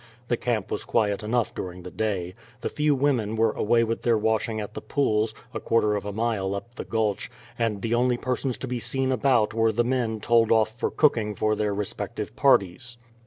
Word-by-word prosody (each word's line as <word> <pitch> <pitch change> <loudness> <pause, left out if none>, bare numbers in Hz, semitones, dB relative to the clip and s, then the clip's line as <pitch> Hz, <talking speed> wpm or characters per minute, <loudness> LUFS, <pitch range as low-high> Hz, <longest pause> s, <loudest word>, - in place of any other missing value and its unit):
The 120 - +3
camp 115 -2 -2
was - - -2
quiet 105 -2 +1
enough 115 +2 0
during 90 0 -6
the 90 - -8
day. 95 -3 -2 0.3
The - - -2
few 150 -1 +1
women 130 -6 +1
were 110 0 +3
away 115 +3 +2
with 115 0 -2
their 115 -2 +3
washing 110 +1 0
at 105 - -6
the - - -6
pools, 110 -6 0 0.2
a - - -3
quarter 105 -2 +2
of 100 0 -3
a - - -2
mile 105 -3 -1
up 115 +4 -7
the - - -6
Gulch, 110 -3 -1 0.3
and 110 -4 -1
the 115 0 0
only 125 +1 +2
persons 125 0 -2
to 130 - -6
be 125 -1 -2
seen 130 +3 -1
about 125 -4 +2
were 115 0 +3
the 120 +2 +1
men 120 -3 -1
told 115 0 +3
off 110 -1 +4
for 120 - -1
cooking 110 -8 +2
for 110 +2 +1
their 105 -1 0
respective 100 0 -4
parties. 120 +6 +2
115 Hz, 210 wpm, -25 LUFS, 105-120 Hz, 0.3 s, off